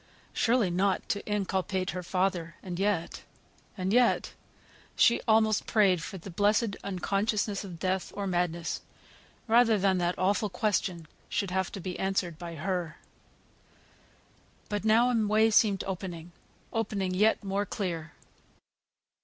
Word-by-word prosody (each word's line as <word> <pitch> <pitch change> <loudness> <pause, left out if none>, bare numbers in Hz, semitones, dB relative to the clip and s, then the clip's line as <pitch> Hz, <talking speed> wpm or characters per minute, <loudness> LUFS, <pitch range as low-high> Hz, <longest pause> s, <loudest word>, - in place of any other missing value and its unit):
Surely 230 -6 +2
not 190 +2 0
to 205 - -1
inculpate 190 -2 -1
her 180 - -4
father 180 -2 -1
and 180 -2 -5
yet 195 -4 -1 0.6
and 190 +1 -1
yet 245 0 +3 0.6
she 235 - +4
almost 220 -1 +3
prayed 195 -6 +3
for 190 - -6
the 185 +2 -9
blessed 205 +3 +2
unconsciousness 200 +2 -1
of 180 -4 -8
death 185 +2 -2
or 200 - -3
madness, 175 -2 -1 0.7
rather 230 -1 +5
than 190 -1 +2
that 175 0 0
awful 205 +3 +1
question 185 -5 -1 0.2
should 195 -3 -1
have 190 0 -1
to - - -6
be 180 0 -5
answered 190 -4 -1
by 170 -1 -7
her. 170 0 -3 1.7
But 205 -1 -2
now 230 +3 +4
a 225 -3 +1
way 220 +2 +4
seemed 210 -2 +3
opening, 175 -3 -6 0.4
opening 200 -4 -1
yet 210 +4 +3
more 200 +1 -1
clear. 165 -6 -4
195 Hz, 135 wpm, -29 LUFS, 180-210 Hz, 1.7 s, rather